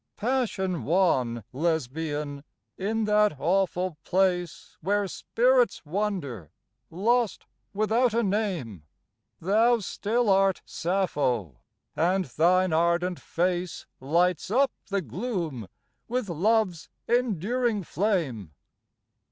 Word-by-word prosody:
Passion 205 Hz, -, -1 dB
wan 130 Hz, -, +1 dB
Lesbian, 150 Hz, -1 st, -2 dB, 0.3 s
in 220 Hz, +4 st, -1 dB
that 210 Hz, -4 st, +3 dB
awful 180 Hz, -1 st, 0 dB
place 180 Hz, -2 st, 0 dB
Where 205 Hz, +1 st, +1 dB
spirits 245 Hz, -1 st, +1 dB
wander 150 Hz, -, -3 dB, 0.4 s
lost 225 Hz, +6 st, 0 dB, 0.3 s
without 220 Hz, +4 st, +2 dB
a 235 Hz, -, +2 dB
name 190 Hz, -, -2 dB, 0.6 s
Thou 225 Hz, +7 st, +3 dB
still 225 Hz, +3 st, -1 dB
art 195 Hz, -1 st, +3 dB
Sappho, 140 Hz, -, -1 dB, 0.4 s
and 180 Hz, +4 st, +1 dB
thine 175 Hz, +5 st, +2 dB
ardent 170 Hz, +2 st, +1 dB
face 175 Hz, 0 st, -2 dB
Lights 170 Hz, +7 st, +1 dB
up 260 Hz, +4 st, +3 dB, 0.2 s
the 200 Hz, -1 st, -1 dB
gloom 160 Hz, -, -4 dB, 0.4 s
with 240 Hz, -4 st, -2 dB
love's 185 Hz, 0 st, +1 dB, 0.2 s
enduring 235 Hz, -1 st, 0 dB
flame. 155 Hz, -, -1 dB
185 Hz, 95 wpm, -27 LUFS, 160-210 Hz, 0.6 s, that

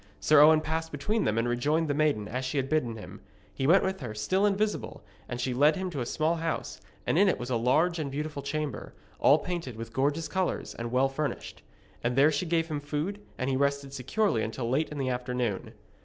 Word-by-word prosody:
Sir 150 Hz, -1 st, +6 dB
Owen 155 Hz, +1 st, +7 dB
passed 160 Hz, +1 st, -3 dB
between 210 Hz, +10 st, -1 dB
them 110 Hz, -, +1 dB
and 115 Hz, +1 st, +1 dB
rejoined 150 Hz, +7 st, +1 dB
the 145 Hz, -, 0 dB
maiden, 145 Hz, -8 st, +1 dB
as 125 Hz, +4 st, -3 dB
she 130 Hz, +3 st, -2 dB
had 135 Hz, 0 st, 0 dB
bidden 125 Hz, -8 st, 0 dB
him. 105 Hz, -, -10 dB, 0.3 s
He 135 Hz, -, -1 dB
went 185 Hz, +5 st, +6 dB
with 190 Hz, 0 st, -1 dB
her, 120 Hz, -5 st, -6 dB
still 190 Hz, -, +1 dB
invisible, 205 Hz, -8 st, -1 dB, 0.3 s
and 120 Hz, -, -4 dB
she 125 Hz, 0 st, -1 dB
led 145 Hz, +5 st, +4 dB
him 190 Hz, -1 st, -3 dB
to 140 Hz, -5 st, -3 dB
a 120 Hz, -, -3 dB
small 160 Hz, +5 st, 0 dB
house, 165 Hz, 0 st, -3 dB, 0.2 s
and 165 Hz, -, +2 dB
in 200 Hz, 0 st, +6 dB
it -, -, +1 dB
was 125 Hz, +1 st, -5 dB
a -, -, +2 dB
large 155 Hz, +9 st, +2 dB
and 150 Hz, -3 st, -2 dB
beautiful 145 Hz, +1 st, -4 dB
chamber, 150 Hz, +1 st, -4 dB, 0.2 s
all 145 Hz, -, +6 dB
painted 165 Hz, -7 st, -4 dB
with 115 Hz, 0 st, -8 dB
gorgeous 145 Hz, +5 st, 0 dB
colours, 185 Hz, -1 st, -2 dB
and 115 Hz, 0 st, -5 dB
well 130 Hz, +2 st, +3 dB
furnished. 140 Hz, +2 st, -4 dB, 0.4 s
And 120 Hz, +1 st, 0 dB
there 140 Hz, +4 st, +5 dB
she 155 Hz, +4 st, -1 dB
gave 165 Hz, 0 st, +1 dB
him 150 Hz, -3 st, -3 dB
food, 150 Hz, +8 st, -3 dB, 0.2 s
and 130 Hz, -, -2 dB
he 135 Hz, -, +1 dB
rested 140 Hz, 0 st, 0 dB
securely 140 Hz, -, 0 dB
until 115 Hz, +2 st, -3 dB
late 140 Hz, +6 st, +1 dB
in 150 Hz, -, -7 dB
the 135 Hz, -2 st, -1 dB
afternoon. 125 Hz, -4 st, -2 dB
145 Hz, 225 wpm, -28 LUFS, 125-160 Hz, 0.4 s, Owen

